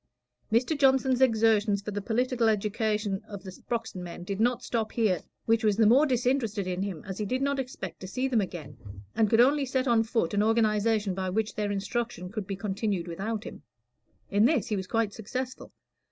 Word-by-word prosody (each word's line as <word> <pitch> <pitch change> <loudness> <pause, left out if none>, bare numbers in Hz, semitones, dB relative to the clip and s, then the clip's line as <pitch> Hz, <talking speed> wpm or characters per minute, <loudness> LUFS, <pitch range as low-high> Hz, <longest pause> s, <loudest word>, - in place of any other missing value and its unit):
Mr. 245 +8 +2
Johnson's 265 -2 +3
exertions 220 -4 +3
for 210 - -4
the 205 0 -3
political 240 +2 +1
education 210 -1 0
of 200 -2 -8
the 190 - -7
Sproxton 225 -1 -5
men 175 0 -7
did 195 +2 -4
not 240 +1 +1
stop 225 -2 -2
here, 205 -8 +1 0.2
which 225 0 +2
was 210 -2 +2
the 225 - +5
more 265 +8 +6
disinterested 245 -5 0
in 180 0 -2
him 190 -6 -4
as 190 +1 -6
he 210 - -1
did 255 +5 0
not 280 0 0
expect 260 -1 -6
to 185 - -7
see 255 +7 -1
them 240 -5 +2
again, 155 -8 -6 0.4
and 220 -2 +2
could 225 - +3
only 280 +3 +4
set 260 +1 0
on 235 -2 +4
foot 225 -6 -1
an 205 - +2
organization 215 -2 +2
by 185 0 -2
which 215 +3 -1
their 205 -1 -2
instruction 200 -2 -3
could 210 -3 -5
be 195 - -3
continued 200 -2 -2
without 205 +6 -3
him. - - -9 0.7
In 205 +2 +4
this 255 - +2
he 215 - 0
was 190 -2 -4
quite 225 0 0
successful. 250 +5 -5
220 Hz, 200 wpm, -28 LUFS, 195-240 Hz, 0.7 s, more